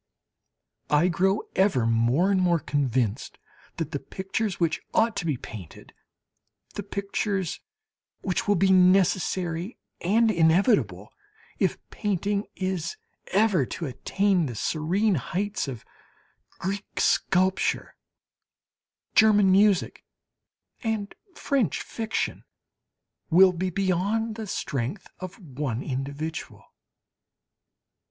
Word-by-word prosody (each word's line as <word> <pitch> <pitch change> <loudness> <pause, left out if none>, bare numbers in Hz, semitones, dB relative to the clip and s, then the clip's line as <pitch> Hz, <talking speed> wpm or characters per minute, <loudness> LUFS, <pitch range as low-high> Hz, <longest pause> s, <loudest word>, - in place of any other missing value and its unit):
I 150 +5 +4
grow 190 +4 +1
ever 190 - +3
more 120 +11 +2
and 190 -2 +2
more 175 -2 +3
convinced 130 -7 -1 0.4
that 160 -2 -3
the 140 - -2
pictures 195 +4 -3
which 165 -2 0
ought 225 -1 +3
to 175 - -2
be 145 -5 0
painted, 100 -8 -11 0.8
the - - -4
pictures 200 -2 -2 0.6
which 185 +1 -2
will 205 - +4
be 190 +1 +3
necessary 185 0 +2 0.3
and 220 +5 +3
inevitable 160 - +2 0.5
if - - +1
painting 205 0 -1
is 185 - -3 0.3
ever 200 -7 +3
to 170 - -5
attain 180 +6 0
to 120 - -5
the - - -9
serene 180 - +1
heights 190 - -2
of 125 -5 -7 0.7
Greek 195 +2 -4
sculpture, 185 +1 +1 1.2
German 210 -3 +5
music 200 -1 +3 0.8
and 220 -3 -2 0.2
French 275 -8 0
fiction, 225 -1 -3 0.9
will 185 +2 +6
be 185 +2 -2
beyond 195 +5 0
the 220 -1 -6
strength 140 - -3
of 185 +2 -7
one 135 - -4
individual. 140 +4 -5
185 Hz, 105 wpm, -26 LUFS, 155-200 Hz, 1.2 s, will